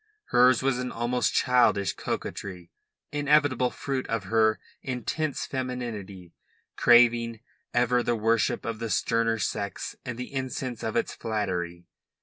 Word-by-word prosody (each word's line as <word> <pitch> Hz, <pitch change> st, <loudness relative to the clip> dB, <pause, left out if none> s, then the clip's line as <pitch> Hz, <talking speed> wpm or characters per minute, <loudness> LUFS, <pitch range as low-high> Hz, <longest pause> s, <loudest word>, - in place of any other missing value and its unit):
Hers 125 Hz, 0 st, +5 dB
was 135 Hz, -2 st, +1 dB
an 125 Hz, 0 st, -3 dB
almost 120 Hz, +1 st, 0 dB
childish 120 Hz, -6 st, +3 dB
coquetry, 90 Hz, -3 st, -5 dB, 0.4 s
inevitable 145 Hz, -3 st, +3 dB
fruit 135 Hz, 0 st, -3 dB
of 115 Hz, -3 st, -1 dB
her 110 Hz, +2 st, +2 dB, 0.2 s
intense 135 Hz, +4 st, -2 dB
femininity, 115 Hz, -9 st, -5 dB, 0.4 s
craving 120 Hz, -1 st, +4 dB, 0.3 s
ever 125 Hz, 0 st, +2 dB
the 120 Hz, 0 st, 0 dB
worship 115 Hz, 0 st, +1 dB
of 115 Hz, -1 st, -3 dB
the 115 Hz, -1 st, -3 dB
sterner 115 Hz, +1 st, +1 dB
sex 100 Hz, -2 st, -3 dB
and 125 Hz, -2 st, -5 dB
the 125 Hz, +2 st, -7 dB
incense 130 Hz, -2 st, -3 dB
of 110 Hz, -, -3 dB
its -, -, 0 dB
flattery. 90 Hz, -6 st, -3 dB
120 Hz, 130 wpm, -27 LUFS, 110-125 Hz, 0.4 s, Hers